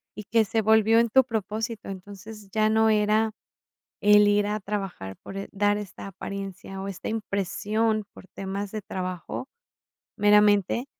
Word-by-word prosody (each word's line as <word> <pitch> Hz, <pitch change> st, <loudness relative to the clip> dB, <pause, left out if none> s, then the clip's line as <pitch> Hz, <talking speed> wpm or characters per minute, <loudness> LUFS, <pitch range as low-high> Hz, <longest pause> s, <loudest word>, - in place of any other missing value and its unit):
y 210 Hz, -, -7 dB
que 225 Hz, +2 st, +3 dB
se 225 Hz, +2 st, 0 dB
volvió 220 Hz, +1 st, +5 dB
en 235 Hz, 0 st, +2 dB
tu 265 Hz, +4 st, +5 dB
propósito. 220 Hz, -1 st, -4 dB
Entonces, 200 Hz, +2 st, -10 dB
ya 215 Hz, +1 st, +2 dB
no 220 Hz, 0 st, +4 dB
era 215 Hz, +1 st, +2 dB, 0.7 s
el 210 Hz, 0 st, +6 dB
ir 205 Hz, 0 st, +3 dB
a 210 Hz, +1 st, -1 dB
trabajar 195 Hz, -, -5 dB
por 195 Hz, -, -8 dB
e 195 Hz, -, -6 dB
dar 205 Hz, +1 st, +2 dB
esta 205 Hz, -2 st, -8 dB
apariencia, 195 Hz, 0 st, -7 dB
o, 195 Hz, -, -5 dB
esta 195 Hz, -2 st, -6 dB
impresión 215 Hz, +1 st, -1 dB
por -, -, -14 dB
temas 195 Hz, +2 st, -5 dB
de 215 Hz, -1 st, -4 dB
trabajo 185 Hz, +6 st, -5 dB, 0.7 s
meramente, 210 Hz, +2 st, +4 dB
210 Hz, 155 wpm, -26 LUFS, 195-220 Hz, 0.7 s, el